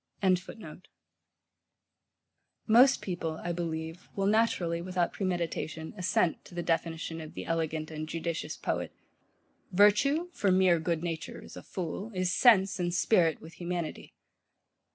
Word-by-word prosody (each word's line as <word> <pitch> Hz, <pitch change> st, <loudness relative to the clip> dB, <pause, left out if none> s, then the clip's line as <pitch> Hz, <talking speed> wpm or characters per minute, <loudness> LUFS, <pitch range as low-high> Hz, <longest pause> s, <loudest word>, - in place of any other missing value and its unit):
] 190 Hz, -2 st, +2 dB, 2.3 s
Most 250 Hz, +4 st, +6 dB
people, 175 Hz, -4 st, -3 dB
I 175 Hz, -, -2 dB
believe, 165 Hz, 0 st, -4 dB
will 195 Hz, -, 0 dB
naturally, 195 Hz, -6 st, +2 dB
without 180 Hz, -1 st, -1 dB
premeditation, 170 Hz, -4 st, -3 dB
assent 180 Hz, -3 st, +1 dB
to 175 Hz, -, -13 dB
the 175 Hz, -, -2 dB
definition 165 Hz, 0 st, -2 dB
of 155 Hz, -, -10 dB
the -, -, -5 dB
elegant 160 Hz, -1 st, -2 dB
and 155 Hz, 0 st, -5 dB
judicious 165 Hz, 0 st, -3 dB
poet: -, -, -3 dB, 0.8 s
Virtue 245 Hz, -, +4 dB
(for 200 Hz, -2 st, +1 dB
mere 185 Hz, -2 st, +4 dB
good 165 Hz, 0 st, -1 dB
nature 165 Hz, -2 st, -4 dB
is -, -, -12 dB
a -, -, -8 dB
fool) 185 Hz, +4 st, -5 dB
Is 185 Hz, -1 st, 0 dB
sense 200 Hz, -5 st, +5 dB
and 175 Hz, -1 st, 0 dB
spirit 175 Hz, -2 st, +2 dB
with 160 Hz, +2 st, -11 dB
humanity. 175 Hz, -2 st, -4 dB
175 Hz, 130 wpm, -30 LUFS, 165-190 Hz, 2.3 s, Most